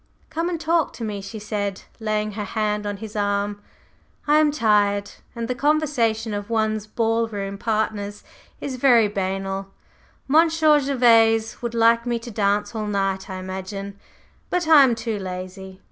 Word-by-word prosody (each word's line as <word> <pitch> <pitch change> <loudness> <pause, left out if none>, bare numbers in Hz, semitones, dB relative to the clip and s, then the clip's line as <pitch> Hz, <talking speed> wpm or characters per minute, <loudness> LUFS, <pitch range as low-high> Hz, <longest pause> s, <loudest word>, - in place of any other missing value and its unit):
"Come 330 +2 -1
and 340 -2 -3
talk 330 0 +1
to 235 - -7
me," 210 -2 -4
she 195 +3 -8
said, 205 -2 -3 0.2
laying 215 -1 -1
her 210 0 -4
hand 210 -1 -2
on 205 -1 -3
his 215 +1 -9
arm; 205 0 -1 0.7
"I 300 +1 +5
am 310 -1 +4
tired, 205 -7 +2 0.2
and 230 -1 -3
the 250 - -1
conversation 250 -6 +1
of 205 +1 -4
one's 215 -2 0
ball 225 +1 0
room 200 -2 -5
partners 215 -2 -2 0.4
is 265 -3 -5
very 240 -4 +5
banal. 195 -1 -3 0.6
Monsieur 315 0 +4
Gervase 230 -5 +3
would 235 -1 -4
like 230 +1 +4
me 240 -1 0
to 235 +1 -8
dance 205 +1 0
all 215 -2 -3
night, 195 -1 -1
I 190 - -5
imagine; 190 +2 -6 0.5
but 355 -2 0
I 310 -3 +8
am 250 -3 +3
too 225 -2 -3
lazy. 185 0 -7
215 Hz, 160 wpm, -23 LUFS, 200-240 Hz, 0.7 s, I